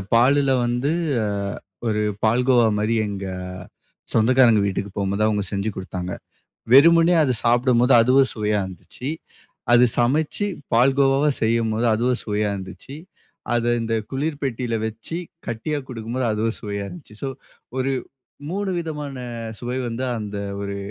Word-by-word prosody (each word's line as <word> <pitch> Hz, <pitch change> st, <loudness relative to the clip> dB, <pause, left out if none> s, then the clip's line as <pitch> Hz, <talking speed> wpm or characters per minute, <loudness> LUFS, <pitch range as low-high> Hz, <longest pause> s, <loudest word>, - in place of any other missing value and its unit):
பாலுல 135 Hz, +3 st, +4 dB
வந்து, 120 Hz, +4 st, 0 dB, 0.3 s
அ -, -, 0 dB, 0.6 s
ஒரு 105 Hz, -1 st, +1 dB, 0.2 s
பால் 115 Hz, +3 st, +3 dB
கோவா 120 Hz, -3 st, +5 dB
மாரி 110 Hz, +2 st, +1 dB
எங்க 100 Hz, -1 st, -5 dB, 0.9 s
சொந்தக்காரங்க 115 Hz, -1 st, +5 dB
வீட்டுக்கு 100 Hz, 0 st, -2 dB
போம்போது 100 Hz, +1 st, 0 dB
அவங்க 105 Hz, -2 st, 0 dB
செஞ்சு 100 Hz, +1 st, -1 dB
குடுத்தாங்க. 90 Hz, -1 st, -5 dB, 0.6 s
வெறுமனே 165 Hz, +5 st, +7 dB
அது 130 Hz, -, +1 dB
சாப்பிடும்போது 120 Hz, +1 st, +3 dB
அதுவும் 130 Hz, +3 st, +4 dB
சுவையா 105 Hz, -1 st, 0 dB
இருந்துச்சு. 95 Hz, +8 st, -8 dB, 0.6 s
அது 120 Hz, +1 st, +7 dB
சமைச்சு 150 Hz, +11 st, +1 dB, 0.3 s
பால் 125 Hz, +4 st, +4 dB
கோவாவா 135 Hz, +2 st, +4 dB
செய்யும்போது 115 Hz, 0 st, +1 dB
அதுவும் 125 Hz, +3 st, +1 dB
சுவையா 105 Hz, -1 st, 0 dB
இருந்துச்சி. 95 Hz, +8 st, -9 dB, 0.6 s
அதை 120 Hz, 0 st, +1 dB
இந்த 115 Hz, 0 st, -1 dB, 0.2 s
குளிர் 145 Hz, +2 st, -2 dB
பெட்டியில 125 Hz, -3 st, -2 dB
வச்சி 115 Hz, +9 st, -6 dB, 0.3 s
கட்டியா 120 Hz, +6 st, -2 dB
குடுக்கும்போது 120 Hz, +1 st, -3 dB
அதுவும் 110 Hz, +1 st, -1 dB
சுவையா 100 Hz, -2 st, -4 dB
இருந்துச்சு. 145 Hz, -, -12 dB
சோ 135 Hz, -, -1 dB, 0.5 s
ஒரு 135 Hz, +1 st, 0 dB, 0.6 s
3 200 Hz, +1 st, -2 dB
விதமான 150 Hz, -5 st, -5 dB, 0.4 s
சுவை 125 Hz, +1 st, -3 dB
வந்து 120 Hz, +3 st, -3 dB
அந்த 105 Hz, -1 st, -5 dB, 0.2 s
ஒரு 100 Hz, 0 st, -4 dB
120 Hz, 130 wpm, -22 LUFS, 105-135 Hz, 0.9 s, வெறுமனே